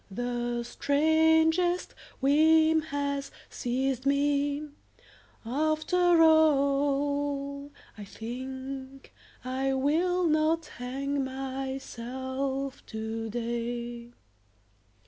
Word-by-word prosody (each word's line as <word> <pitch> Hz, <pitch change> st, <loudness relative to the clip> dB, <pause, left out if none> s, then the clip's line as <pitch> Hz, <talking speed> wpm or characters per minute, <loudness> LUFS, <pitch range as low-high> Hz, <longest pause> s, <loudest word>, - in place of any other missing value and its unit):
The 240 Hz, +2 st, -2 dB
strangest 320 Hz, +6 st, +2 dB, 0.3 s
whim 315 Hz, +3 st, +5 dB
has 280 Hz, -1 st, -2 dB, 0.2 s
seized 260 Hz, +1 st, -1 dB
me... 285 Hz, +1 st, +1 dB, 0.8 s
After 315 Hz, +6 st, +2 dB
all 285 Hz, -2 st, +2 dB, 0.3 s
I -, -, -6 dB
think 260 Hz, +5 st, -7 dB, 0.3 s
I 265 Hz, +1 st, -1 dB
will 345 Hz, +7 st, +1 dB
not 315 Hz, +1 st, +2 dB
hang 275 Hz, +2 st, -3 dB
myself 265 Hz, 0 st, -4 dB
today. 235 Hz, +2 st, -4 dB
275 Hz, 65 wpm, -28 LUFS, 255-305 Hz, 0.8 s, whim